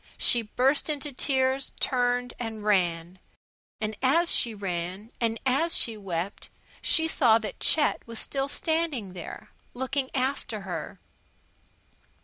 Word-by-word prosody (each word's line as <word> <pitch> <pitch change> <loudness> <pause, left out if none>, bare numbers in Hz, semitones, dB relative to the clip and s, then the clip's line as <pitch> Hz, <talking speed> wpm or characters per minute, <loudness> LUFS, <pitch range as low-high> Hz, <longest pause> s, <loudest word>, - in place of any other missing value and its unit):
She 240 - +4
burst 260 +8 +1
into 295 -1 -3
tears, 265 0 0
turned, 245 -1 +1
and 225 -3 -5
ran. 180 -3 +1 0.6
And 215 0 -2
as 330 +6 +3
she 230 -2 +1
ran, 190 +2 -4
and 230 -1 0
as 285 +6 +3
she 230 - +1
wept, 190 -2 -4 0.3
she 320 -1 +4
saw 240 -8 +4
that 215 -4 -6
Chet 305 -2 +4
was 230 -1 -7
still 270 +4 -1
standing 310 - -1
there, 175 -2 -9 0.2
looking 260 +1 -2
after 255 -5 -1
her. 190 -2 -6
240 Hz, 125 wpm, -27 LUFS, 205-270 Hz, 0.6 s, She